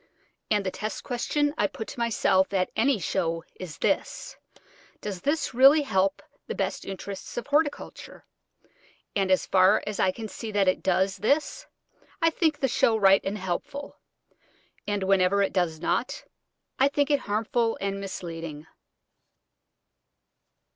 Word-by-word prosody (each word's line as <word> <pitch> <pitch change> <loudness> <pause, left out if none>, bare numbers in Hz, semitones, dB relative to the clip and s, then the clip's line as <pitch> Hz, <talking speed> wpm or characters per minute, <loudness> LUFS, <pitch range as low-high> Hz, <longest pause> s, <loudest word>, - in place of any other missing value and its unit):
And 205 -2 +1
the 185 - -1
test 215 +3 -5
question 290 +3 0
I 205 - +3
put 220 - -7
to - - -8
myself 200 -4 +2
at 185 -1 +1
any 255 +2 +3
show 165 -3 -1 0.2
is 180 -5 -7
this, - - -1 0.6
Does 195 -4 -5
this 295 -1 -1
really 275 +5 +7
help 195 -6 0 0.2
the - - -4
best - - -2
interests 195 +2 -7
of 240 - -3
horticulture? 290 +1 -2 0.9
And 195 -2 +1
as 185 - +3
far 190 +2 +4
as 210 -1 -4
I 190 - +3
can 220 +4 -5
see 220 +1 -7
that 200 -2 +2
it 185 - +2
does 190 +1 +1
this, 285 +8 0 0.5
I 330 -2 +3
think 315 -2 +1
the 270 - +2
show 230 -2 +2
right 195 -2 +5
and 200 +2 -3
helpful; 280 +11 -5 0.9
and 205 -1 -1
whenever 195 +1 +3
it 195 - -1
does 175 -4 0
not, 235 +8 -1 0.6
I 270 - +6
think 285 +1 0
it 285 - +3
harmful 225 +2 0
and 195 0 -3
misleading. 165 -5 -6
205 Hz, 145 wpm, -26 LUFS, 190-255 Hz, 0.9 s, really